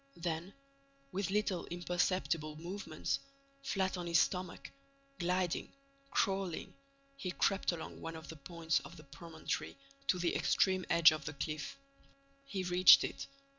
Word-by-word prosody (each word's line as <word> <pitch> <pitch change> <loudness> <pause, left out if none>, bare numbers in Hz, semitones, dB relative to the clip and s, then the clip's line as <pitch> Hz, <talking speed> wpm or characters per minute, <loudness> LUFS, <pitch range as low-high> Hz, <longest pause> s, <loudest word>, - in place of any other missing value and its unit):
Then, 170 +2 -3 0.6
with 195 -1 -1
little 200 -3 0
imperceptible 175 -3 0
movements, 160 -4 -3 0.4
flat 195 -8 0
on 175 -1 -4
his 170 -1 +4
stomach, 180 -2 0 0.5
gliding, 180 0 0 0.4
crawling, 190 -7 0 0.4
he 195 -9 -4
crept 195 +2 +1
along 170 -2 -7
one 165 0 -5
of 160 -1 -9
the 160 - -7
points 165 +3 0
of - - -11
the 155 - -12
promontory 160 +2 -5 0.3
to 185 - +3
the 175 -1 0
extreme 185 -1 +2
edge 170 -2 +8
of 155 -2 -4
the 145 - -4
cliff. 150 - -4 0.7
He 195 -8 -2
reached 180 0 +8
it. - - -4
175 Hz, 135 wpm, -35 LUFS, 160-185 Hz, 0.7 s, edge